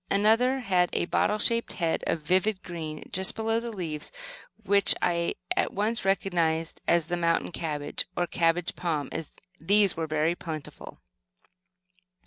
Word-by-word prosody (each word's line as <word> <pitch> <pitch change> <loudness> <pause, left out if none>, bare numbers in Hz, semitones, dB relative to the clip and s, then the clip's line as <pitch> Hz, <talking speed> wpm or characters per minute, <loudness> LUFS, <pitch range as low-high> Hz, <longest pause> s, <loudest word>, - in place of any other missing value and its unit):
Another 225 +6 +3
had 180 -6 +2
a - - +1
bottle 210 +4 +1
shaped 230 +2 0
head 165 -3 -1
of 160 - -1
vivid 185 +5 +1
green 155 -3 -6
just 190 +1 +2
below 225 0 0
the 235 0 -5
leaves, 165 -8 -5 0.5
which 200 -1 +4
I 170 -1 0 0.2
at - - 0
once 215 +4 0
recognized 170 -4 0
as 170 -2 +3
the 175 +2 -2
"mountain 165 0 +1
cabbage," 150 -4 -3
or 175 - +2
cabbage 170 0 0
palm. 160 -5 -2 0.5
These 200 +2 +3
were 160 -1 -2
very 155 +2 +1
plentiful. 160 -4 -8
175 Hz, 140 wpm, -27 LUFS, 165-200 Hz, 0.5 s, which